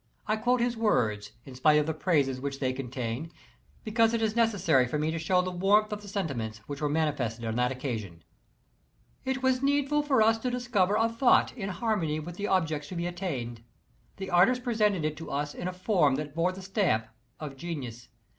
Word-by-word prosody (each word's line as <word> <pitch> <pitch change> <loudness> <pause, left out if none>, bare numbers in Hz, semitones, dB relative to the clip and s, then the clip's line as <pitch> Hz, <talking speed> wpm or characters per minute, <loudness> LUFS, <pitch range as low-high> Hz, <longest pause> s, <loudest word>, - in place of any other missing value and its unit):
I 215 - +1
quote 245 +3 +1
his 240 0 +1
words, 110 - 0
in 135 - -10
spite 150 +4 +4
of 150 - +2
the 160 - -1
praises 145 -6 +1
which 140 0 -4
they 130 -2 0
contain, 130 +3 -4 0.5
because 225 +1 +2
it 230 - -1
is 220 0 0
necessary 195 - +3
for 140 - -2
me 155 +1 0
to 165 - -3
show 180 +3 +2
the 185 - -3
warmth 205 +4 +3
of 210 - -5
tlie 205 - -12
sentiments 135 - -3
which 145 0 -6
were 150 - +1
manifested 140 -7 -1
on 110 - -1
that 125 +1 +2
occasion: 110 - -5 1.0
It 265 0 -2
was 260 -1 +2
needful 285 +1 +2
for 270 -6 +3
us 225 +1 +3
to 250 - -1
discover 240 -6 +1
a 225 - +3
thought 230 +2 +3
in 200 -5 -4
harmony 180 -6 -1
with 170 +3 -8
the 205 - -2
object 160 -6 0
to 185 - -6
be 170 0 -2
attained. 145 -11 -4 0.6
The 190 -1 -6
artist 220 +9 +4
presented 210 - +1
it 155 0 -1
to 165 - -8
us 145 +1 -2
in 175 - -5
a - - -1
form 180 -6 +2
that 145 0 -4
bore 170 +3 +1
the 190 +1 -9
stamp 185 - +1 0.3
of 150 -3 -6
genius. 130 -6 -6
175 Hz, 205 wpm, -28 LUFS, 140-215 Hz, 1.0 s, spite